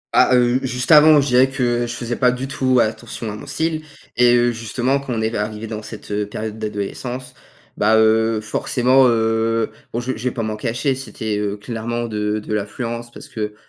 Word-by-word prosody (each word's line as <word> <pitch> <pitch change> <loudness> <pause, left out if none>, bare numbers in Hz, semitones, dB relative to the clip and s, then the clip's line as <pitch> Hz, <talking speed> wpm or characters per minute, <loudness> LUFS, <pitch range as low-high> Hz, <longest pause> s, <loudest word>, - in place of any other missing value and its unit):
Ah, 125 - +5
heu, 125 +1 +3
juste 125 +3 -1
avant, 150 -1 +8
je 140 - -2
dirais 130 +2 +5
que 120 -2 0
je - - -5
faisais 120 0 -3
pas 125 0 +3
du 130 +2 -4
tout 130 -1 +1
attention 110 0 -2
à - - -6
mon - - -10
style 160 -1 -1 0.3
et 120 0 +5
heu, 120 0 +3
justement 120 +4 -1
quand 135 -2 -7
on 110 -2 -1
est 110 - -1
arrivé 105 +1 -3
dans 110 -1 -5
cette, 105 -1 -10
heu, 105 0 -1
période 110 +1 -5
d'adolescence, 110 +5 -5 0.4
bah, 110 +1 +4
heu, 110 0 +3
forcément, 125 +4 +2
heu, 115 -1 +1 0.2
bon 120 - -2
je 130 +2 -2
je 115 - -8
vais 125 - +3
pas 115 -4 -3
m'en 110 0 -2
cacher, 120 +5 -1
c'était, 110 -4 -4
heu, 105 0 -2
clairement 120 +2 -4
de 105 -1 -1
de 105 0 -5
l'influence 115 +3 -4
parce - - -11
que, 105 -1 -5
115 Hz, 205 wpm, -20 LUFS, 110-125 Hz, 0.4 s, avant